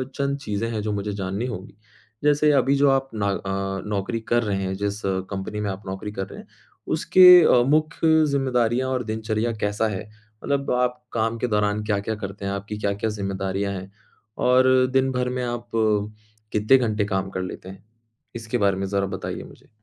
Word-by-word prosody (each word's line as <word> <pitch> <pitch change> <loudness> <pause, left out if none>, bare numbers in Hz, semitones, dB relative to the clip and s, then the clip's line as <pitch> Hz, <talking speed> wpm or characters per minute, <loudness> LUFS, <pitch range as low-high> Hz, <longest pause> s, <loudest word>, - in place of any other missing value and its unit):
अ, - - -15
चंद 140 0 -1
चीज़ें 115 -4 -3
हैं 110 - -2
जो 105 0 -2
मुझे 105 0 -3
जाननी 100 +3 -3
होंगीं। 100 -6 -7 0.5
जैसे 150 +1 +4
अभी 135 0 +3
जो 140 0 +4
आप 135 0 +1
न 105 - -3
अ, 95 0 -2
नौकरी 105 +3 -2
कर 120 +1 +1
रहे 100 -3 -1
हैं, 95 0 -2
जिस 100 +1 -3 0.3
कंपनी 100 +2 -4
में 105 -1 -1
आप 95 +1 -6
नौकरी 95 +2 -5
कर 95 -1 -4
रहे - - -11
हैं - - -15 0.5
उसके 185 -1 +6 0.2
अ, 120 -5 +5
मुख्य 155 +1 +3
ज़िम्मेदारियाँ 130 -3 +1
और 125 -2 -1
दिनचर्या 110 +1 -2
कैसा 105 +2 0
है? 100 -3 -4 0.4
मतलब 140 -1 -1
आप 125 0 0
काम 115 0 -1
के 125 - 0
दौरान 105 -2 0
क्या-क्या 105 +1 -1
करते 100 +1 -7
हैं, 100 - -1
आपकी 100 +1 -5
क्या-क्या 100 +1 -1
ज़िम्मेदारियाँ 100 -1 -2
हैं 95 0 -7 0.6
और 130 0 +5
दिन 135 0 +2
भर 125 0 -1
में 125 - -1
आप 120 -1 -4 0.8
कितने 110 +5 +4
घंटे 110 -4 0
काम 95 -1 -2
कर 95 - -3
लेते 90 0 -7
हैं? 95 +1 -12 0.5
इसके 115 +1 -3
बारे 100 -3 +2
में 95 - -2
ज़रा 100 0 0
बताइए 95 0 -5
मुझे। - - -15
105 Hz, 190 wpm, -23 LUFS, 100-125 Hz, 0.8 s, उसके